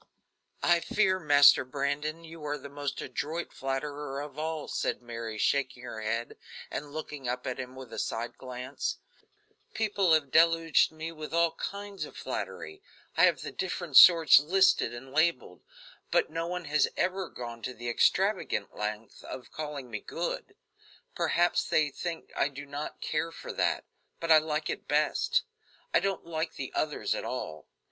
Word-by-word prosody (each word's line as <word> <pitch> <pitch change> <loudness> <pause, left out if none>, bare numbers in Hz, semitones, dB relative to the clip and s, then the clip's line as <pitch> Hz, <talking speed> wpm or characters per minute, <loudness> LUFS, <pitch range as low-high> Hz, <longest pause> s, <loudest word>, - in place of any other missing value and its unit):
"I 170 0 +5
fear, 190 +1 +2
Master 145 -5 +7
Brandon, 145 +4 -2
you 165 -1 -11
are 145 0 -2
the 140 0 -10
most 140 0 -4
adroit 165 +3 -4
flatterer 135 +1 -3
of 145 0 -8
all," 160 -1 -3
said - - -1
Mary, 115 -2 -6
shaking 130 +1 0
her 110 -3 -6
head 115 +2 -3 0.3
and 145 0 -5
looking 150 -4 -5
up 125 +1 -3
at 130 -2 -3
him 130 0 -6
with 130 -3 -10
a - - -4
side 115 +2 -3
glance, 130 +1 -4 0.8
"people 200 -5 +2
have 145 -4 +2
deluged 165 -1 +4
me 160 +1 -6
with 155 0 -6
all 170 -1 +4
kinds 200 +4 -5
of - - -9
flattery 390 0 -5 0.3
I - - +6
have - - +2
the - - -5
different 175 -5 -4
sorts 165 0 +10
listed 190 +6 +3
and 125 +2 -9
labeled 160 +3 +1 0.5
but - - +2
no 165 0 -2
one 180 0 -4
has 150 -1 +3
ever 185 0 0
gone 120 -1 -7
to 125 - -4
the 120 - -7
extravagant 120 - +1
length 105 +1 -5
of 130 - -8
calling 145 -5 -6
me 110 - -3
good. - - -4 0.6
Perhaps 175 +1 +2
they 150 -2 +2
think 170 +3 -5
I - - +2
do 145 0 -8
not 145 +1 -6
care 165 +2 -1
for - - -8
that; - - +1 0.4
but 165 -1 -1
I 155 - +9
like 155 0 -2
it - - -4
best. 460 - +2 0.5
I - - +6
don't 195 -3 -2
like 160 -1 -3
the 130 - -6
others 150 -1 0
at - - -4
all. 80 -1 -5
150 Hz, 170 wpm, -29 LUFS, 130-165 Hz, 0.8 s, sorts